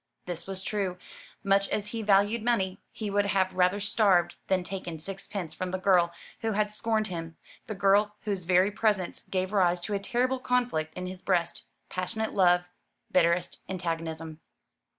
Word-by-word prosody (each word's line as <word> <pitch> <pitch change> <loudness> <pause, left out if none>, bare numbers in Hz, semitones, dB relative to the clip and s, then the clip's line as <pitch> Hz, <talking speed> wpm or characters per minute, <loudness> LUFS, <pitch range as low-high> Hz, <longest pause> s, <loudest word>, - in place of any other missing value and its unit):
This 175 -1 -5
was 190 -1 -4
true. 195 -4 -2 0.5
Much 195 0 +3
as 210 0 -1
he 230 -1 -4
valued 205 +2 +3
money, 195 -5 0
he 210 -2 -4
would 205 0 +2
have 190 -2 +1
rather 185 +2 +3
starved 200 -4 +3
than 185 -1 +2
taken 180 -3 -5
sixpence 190 +1 -5
from 185 - -4
the 185 - -2
girl 180 -2 +4 0.3
who 225 -1 -1
had 210 0 +1
scorned 220 0 0
him; 165 -4 -6 0.3
the 215 - -4
girl 200 +2 +3
whose 195 -4 -3
very 185 +3 +4
presence 205 -4 0
gave 185 +1 -1
rise 180 -3 +3
to 205 - -3
a 200 - +1
terrible 250 +5 0
conflict 245 -12 0
in 180 - -4
his 185 0 -7
breast 180 -3 0 0.2
passionate 220 +4 -3
love, 180 -2 +5 0.5
bitterest 175 0 +2
antagonism. 165 -3 -4
190 Hz, 165 wpm, -28 LUFS, 180-210 Hz, 0.5 s, love